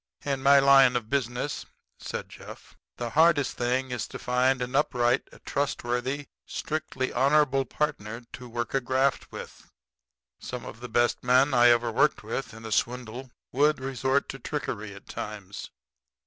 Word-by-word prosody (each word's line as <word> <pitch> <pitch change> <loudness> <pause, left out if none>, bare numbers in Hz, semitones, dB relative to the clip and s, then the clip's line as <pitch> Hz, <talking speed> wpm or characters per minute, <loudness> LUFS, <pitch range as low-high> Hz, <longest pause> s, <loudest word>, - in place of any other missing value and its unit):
"In 135 -2 -1
my 140 +1 +6
line 135 -2 +6
of 115 -2 -2
business," 130 +1 -2 0.3
said - - -5
Jeff, - - -12 0.2
"the 120 -1 -4
hardest 155 -1 +4
thing 125 +2 0
is 125 -3 -3
to - - -8
find 125 +1 +1
an 125 +2 -5
upright, 125 -3 +2 0.2
trustworthy, 135 0 -2 0.2
strictly 155 -4 -3
honorable 135 +1 +3
partner 120 -5 -3
to 125 -1 -9
work 120 0 -4
a 135 - +2
graft 130 +2 0
with. - - -10 0.7
Some 125 -1 -6
of 115 - -9
the 125 0 -8
best 120 +2 +1
men 130 +3 +4
I 120 -1 +6
ever 120 -1 +3
worked 140 +4 +2
with 115 +5 -4
in 110 0 -11
a 110 - -6
swindle 125 +2 -2 0.2
would 150 +3 +3
resort 130 +1 0
to 135 - -6
trickery 110 -10 -4
at 100 - -13
times. 100 -2 -7
125 Hz, 155 wpm, -27 LUFS, 120-140 Hz, 0.7 s, my